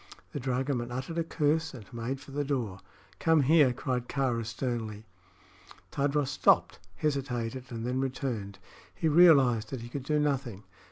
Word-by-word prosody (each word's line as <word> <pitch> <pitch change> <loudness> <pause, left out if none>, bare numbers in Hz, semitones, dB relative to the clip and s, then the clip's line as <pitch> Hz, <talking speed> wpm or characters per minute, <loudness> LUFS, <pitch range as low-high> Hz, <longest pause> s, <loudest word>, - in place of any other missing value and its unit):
The - - -3
dragoman 125 -1 -1
uttered 130 +7 -3
a - - +1
curse 160 -1 0
and 110 -5 -10
made 120 +3 -3
for 140 - -13
the 145 +1 -1
door. 120 -9 -2 0.4
"Come 160 -3 +4
here!" 150 -1 +5
cried 125 -1 -3
Kāra, 130 -4 0
sternly. 110 -2 -4 0.9
Tadros 145 0 0
stopped, - - +3 0.2
hesitated, 130 -2 -2
and 115 -1 -4
then 125 +1 -1
returned. 125 -7 -3 0.4
He 160 - 0
realized 140 -9 +5
that 130 -3 -5
he 120 - -8
could 140 +3 -4
do 150 +4 0
nothing. 135 -8 -1
130 Hz, 155 wpm, -29 LUFS, 120-145 Hz, 0.9 s, here